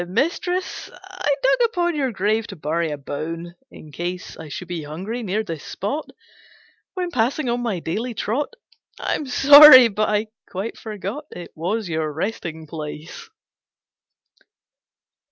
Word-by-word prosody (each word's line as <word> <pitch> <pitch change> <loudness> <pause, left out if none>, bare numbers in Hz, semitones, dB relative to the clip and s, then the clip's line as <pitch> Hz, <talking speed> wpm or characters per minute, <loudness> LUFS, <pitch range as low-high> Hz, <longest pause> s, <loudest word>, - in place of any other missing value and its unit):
"Mistress, 345 - -1
I 375 -6 -3
dug 465 - +4
upon 345 -5 0
your 270 -4 0
grave 215 +2 0
To 195 - -8
bury 160 +1 -1
a 150 - -4
bone, 165 +5 -6 0.2
in 155 - -13
case 175 +4 -5
I 160 -1 -10
should 180 +5 -7
be 175 -2 -4
hungry 185 +11 -5
near 215 0 -1
this 165 -7 -6
spot 275 +11 -4 0.9
When 360 -2 -2
passing 255 +3 0
on 240 +1 0
my 230 -6 -1
daily 225 +9 -3
trot. 280 - -2 0.4
I - - -1
am 295 - -3
sorry, 275 -1 +10
but 215 +1 0
I 210 +1 0 0.2
quite 195 +5 -4
forgot 215 +6 -6
It 175 - -9
was 190 +6 -2
your 160 -2 -2
resting 160 -1 -4
place." 155 - -8
210 Hz, 145 wpm, -22 LUFS, 165-270 Hz, 0.9 s, sorry